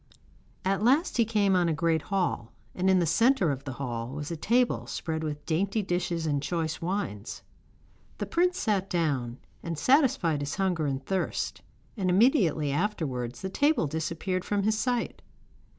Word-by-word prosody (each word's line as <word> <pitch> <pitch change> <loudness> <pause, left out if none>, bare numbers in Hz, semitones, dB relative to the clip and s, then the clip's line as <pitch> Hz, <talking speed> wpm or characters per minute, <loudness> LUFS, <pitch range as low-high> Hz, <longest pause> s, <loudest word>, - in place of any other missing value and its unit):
At 195 0 +1
last 270 - +3
he 230 - +4
came 205 -3 +2
on 175 -2 +3
a - - +1
great 160 0 +1
hall, 180 - -1 0.2
and 185 +1 +1
in 190 - +5
the 175 - +2
centre 230 - +3
of 135 0 -5
the 130 - -4
hall 120 -3 -4
was 150 +2 -5
a - - -2
table 235 +9 +1
spread 160 -1 -3
with 150 -1 -4
dainty 200 +6 0
dishes 175 -2 -1
and 145 -3 0
choice 160 0 -2
wines. 165 - -3 0.7
The - - -3
prince 360 +1 +1
sat 195 -3 0
down, 135 -8 -1 0.2
and 165 -2 -4
satisfied 230 - +3
his 145 +2 -3
hunger 180 -6 0
and 135 -1 -3
thirst, 190 -1 -2 0.3
and 190 -5 -1
immediately 180 - +3
afterwards 140 - -2
the 190 - -2
table 290 - +2
disappeared 165 +4 -2
from 205 0 -1
his 215 +2 +2
sight. 245 +1 -1
175 Hz, 165 wpm, -28 LUFS, 150-205 Hz, 0.7 s, in